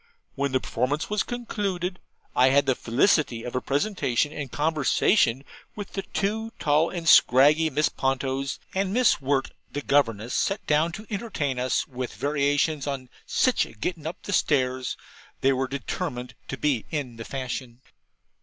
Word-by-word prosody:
When 140 0 -1
the 130 - +2
performance 130 - -2
was 210 - +2
concluded, 195 -7 -3 0.4
I 125 +1 +5
had 140 +1 +4
the 135 - +3
felicity 125 - +2
of 125 - -6
a 125 - 0
presentation 145 - 0
and 140 -5 -5
conversation 150 - +2 0.3
with 205 -2 -7
the 195 - -2
two 220 +4 -2
tall 150 +3 +2
and 170 -2 -5
scraggy 150 +3 +6
Miss 150 +1 +2
Pontos; 135 +1 -1 0.2
and 190 0 0
Miss 250 - +4
Wirt, 135 0 0 0.2
the 145 0 -4
governess, 120 -5 +1
sat 195 +2 0
down 155 +3 +2
to 215 +4 -8
entertain 190 - -2
us 125 +1 0
with 125 -3 -5
variations 145 +1 +1
on 135 -3 -4 0.2
'Sich 255 - +2
a - - -14
gettin' 155 +8 -4
up 165 - -5
Stairs.' 130 -9 +1 0.4
They 135 +1 +4
were 130 0 -1
determined 135 -2 -4
to 135 - -5
be 135 -5 0
in 135 -7 -4
the 115 - -6
fashion. 125 -1 -5
145 Hz, 155 wpm, -26 LUFS, 130-170 Hz, 0.4 s, scraggy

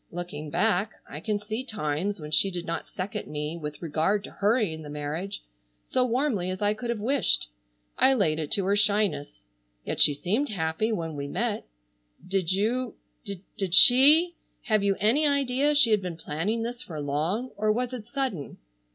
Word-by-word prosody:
"Looking 165 -4 -6
back 200 +4 +1
I 150 - -7
can 210 +5 -1
see 215 +4 -4
times 200 - -2
when 150 -1 -8
she 195 +5 +3
did 175 -2 -5
not 165 -1 -4
second 200 +3 -5
me 150 +2 -4
with 150 -1 -7
regard 165 +6 0
to - - -9
hurrying 205 -6 0
the 150 - -9
marriage, 150 +7 -5 0.4
so 255 - +1
warmly 245 -7 0
as 185 0 -4
I 205 0 +2
could 230 +3 -6
have 235 - 0
wished. 250 - +1 0.5
I 270 - +5
laid 160 -9 +1
it 155 -2 -3
to 195 - 0
her 200 +1 +2
shyness. 205 - 0 0.4
Yet - - -1
she 145 - +6
seemed 210 - -1
happy 170 +3 -1
when 165 -7 -3
we 140 0 -4
met. 140 - -2 0.6
Did 190 -2 0
you—did 200 -3 -3
she—have 265 - +5
you 200 -1 +2
any 255 +9 +3
idea 280 +1 +1
she 245 -6 +6
had 210 -2 +3
been 180 -3 -5
planning 170 +9 -2
this 240 +1 -5
for 160 -4 -7
long, 160 - -2
or 215 +1 +1
was 245 +3 -1
it 230 -4 -7
sudden?" 260 - -3
200 Hz, 175 wpm, -27 LUFS, 160-230 Hz, 0.6 s, she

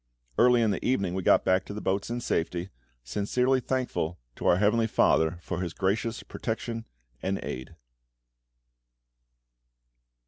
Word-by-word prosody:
Early 125 -1 +6
in 110 - +3
the - - -3
evening 100 -8 +1
we 95 - -1
got - - +4
back 95 0 +3
to 100 - -7
the - - -3
boats 100 +1 -1
in 120 +1 -2
safety, 90 -1 -1 0.3
sincerely 125 - +1
thankful 125 -10 -2 0.2
to - - -3
our 85 - +5
Heavenly 110 +3 +3
FATHER 80 -5 +3
for 90 - -3
His 85 -3 -3
gracious 110 +4 -1
protection 115 0 -4 0.3
and 95 +1 -1
aid. 65 0 -6
100 Hz, 140 wpm, -28 LUFS, 90-115 Hz, 0.3 s, Early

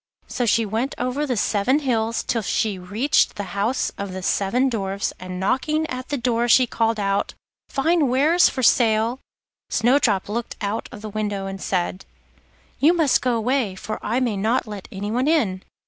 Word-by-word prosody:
So 245 - -2
she 225 +1 +3
went 225 +7 -2
over 255 +4 -1
the 250 -3 -1
seven 215 +6 +2
hills 230 -6 0
till 230 - -1
she 205 -1 -1
reached 210 +10 +1
the 205 - -4
house 210 +6 0
of 200 -2 -4
the 190 0 -6
seven 230 +9 +1
Dwarfs, 200 -5 -2
and 185 0 -6
knocking 305 +10 0
at 255 0 -5
the 285 - -1
door 240 -1 0
she 255 +2 +6
called 225 -2 0
out: 200 0 -1 0.3
'Fine 315 +2 +2
wares 295 +8 +4
for 260 - -4
sale.' 230 +1 +3 0.5
Snowdrop 230 -4 +2
looked 230 +3 -4
out 205 +1 -3
of 210 - -10
the 215 - -5
window 205 -2 -2
and 195 -1 -6
said: 185 0 -2 0.7
'You 310 +5 +5
must 315 -6 +3
go 250 -2 +1
away, 230 -3 0
for 215 +3 -5
I 235 +4 0
may 235 -6 0
not 220 +6 +1
let 205 -3 -8
anyone 215 +7 -2
in. 220 - +1
225 Hz, 180 wpm, -22 LUFS, 200-255 Hz, 0.7 s, she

